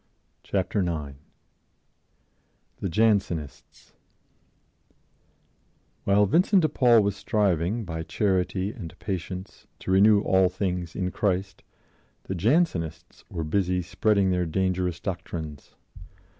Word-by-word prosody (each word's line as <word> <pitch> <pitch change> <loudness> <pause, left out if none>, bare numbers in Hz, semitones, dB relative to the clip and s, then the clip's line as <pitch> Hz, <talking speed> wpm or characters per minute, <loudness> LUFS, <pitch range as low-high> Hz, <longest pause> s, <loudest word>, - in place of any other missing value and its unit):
Chapter 100 +1 -1
9 75 -6 -3 1.6
THE 95 - -2
JANSENISTS 95 - -1 2.1
WHILE 100 +1 +4
Vincent 180 - +3
de 155 - +3
Paul 120 -6 +4
was 100 -1 0
striving, 100 +1 0
by 80 -2 -4
charity 95 +2 0
and 95 -9 -9
patience, 95 0 -6
to - - -5
renew 100 +2 +6
all 95 -2 +3
things 90 -2 -3
in 90 -1 -2
Christ, 95 -1 -1 0.6
the - - -4
Jansenists* 90 - 0
were 85 - -4
busy 90 +2 0
spreading 95 +1 +1
their 90 -1 0
dangerous 90 0 -1
doctrines. 80 -6 -6
95 Hz, 100 wpm, -26 LUFS, 85-100 Hz, 2.1 s, renew